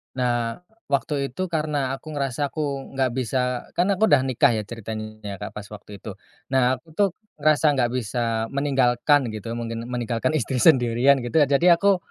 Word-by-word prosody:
Nah, 120 +2 -1 0.2
waktu 140 -1 -1
itu 185 +5 -3
karena 150 -5 -1
aku 155 - -19
ngerasa, 140 -2 -2
aku 140 -3 -4
enggak 130 -1 +1
bisa 130 +1 -1 0.3
kan 180 +3 +1
aku 200 +2 +3
udah 145 -9 +5
nikah 130 -2 +2
ya 110 - -1
ceritanya 110 0 -7
ya, 100 -1 -4
Kak, - - -4
pas 105 - -7
waktu 105 0 -10
itu. 105 +1 -8 0.4
Nah, 130 0 +3
aku 160 +7 -27
tuh 200 +3 +2 0.3
ngerasa 155 +1 +3
enggak 125 -3 +1
bisa 115 -2 -1
meninggalkan 135 0 +2
gitu 110 +1 -6
mungkin 115 0 -5
meninggalkan 120 +4 -1
istri 125 -1 -2
sendirian 125 0 +4
gitu 125 +5 +1
ya. 145 - +3
Jadi, 140 +5 +2
aku 200 +2 +3
130 Hz, 180 wpm, -23 LUFS, 115-145 Hz, 0.4 s, udah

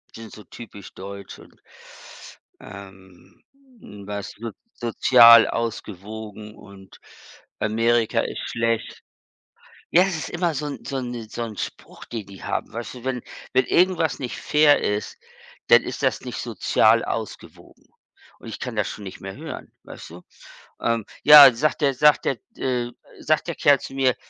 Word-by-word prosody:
die 115 - -10
sind 110 - -11
so 105 - -12
typisch 100 -1 -12
deutsch 100 +1 -10
und - - -19 1.0
ähm, 95 -2 -14 0.7
was 100 -1 -5
so 115 0 -6 0.2
sozial 115 0 +6
ausgewogen 105 -1 -6
und 100 -1 -16 0.6
Amerika 115 +1 +1
ist - - -5
schlecht. 115 -1 -2 0.9
Ja, 175 - +5
es 190 -2 -1
ist 155 -4 -6
immer 175 -2 -1
so 150 +1 -3
'n 145 - -7
so 140 - -5
'n 120 -3 -6
so 120 - -6
'n 110 -2 -8
Spruch, - - -8
den 110 -4 -7
die 100 -1 -13
haben, - - -3
weißt 115 +1 -7
du? 125 - -12
Wenn 130 -2 -3 0.3
wenn 130 - +3
irgendwas 175 -3 +1
nicht 125 -3 -5
fair 150 -1 +3
ist, 105 0 -3 0.5
dann - - +7
ist - - -7
das - - 0
nicht - - -7
sozial - - +2
ausgewogen - - -8 0.5
und - - -11
ich - - -7
kann 125 -3 -6
das 105 - 0
schon 105 - -9
nicht 95 - -9
mehr 95 0 -8
hören, - - -9
weißt - - -11
du? 85 +2 -12 0.6
Ähm, 115 -2 0 0.2
ja, 145 -3 +10
sagt 150 +4 -1
der 140 -1 +2
sagt 150 +3 +4
der 135 - 0 0.2
äh, 125 -2 -2 0.3
sagt 155 +2 0
der 170 - -2
Kerl 145 -2 +4
zu - - -9
mir, 130 -2 +1
115 Hz, 160 wpm, -23 LUFS, 105-135 Hz, 1.0 s, ja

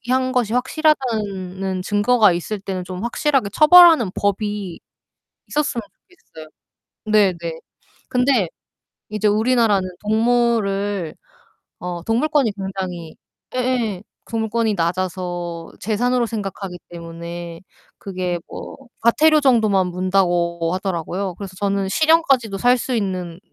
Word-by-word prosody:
유기한 255 +2 0
것이 245 -4 0
확실하다는 210 - -1
증거가 205 +1 +3
있을 175 +5 -3
때는 190 -2 -4
좀 185 +3 -6
확실하게 250 -2 0
처벌하는 320 - +7
법이 205 -2 -2 0.7
있었으면 290 -5 -1
좋겠어요. 160 - -16 0.6
네네. 210 -4 +3 0.7
근데 250 -7 +2 0.6
이제 210 0 0
우리나라는 215 -3 +2
동물을 210 -5 0 0.7
어 175 -1 -5
동물권이 245 - +1
굉장히 185 -4 -5 0.4
예예 245 -6 -1 0.3
동물권이 225 -1 0
낮아서 175 -1 -3
재산으로 245 +4 0
생각하기 195 -4 -5
때문에 170 0 -8 0.4
그게 185 -2 -3
뭐 - - -9 0.2
과태료 305 +7 +4
정도만 215 -8 +3
문다고 175 -2 0
하더라고요. 185 0 -3
그래서 195 -2 -8
저는 200 0 -1
'실형까지도 275 -7 +3
살 245 +5 +4
수 255 +1 -3
있는 185 -5 -3
205 Hz, 280 characters per minute, -20 LUFS, 185-240 Hz, 0.7 s, 처벌하는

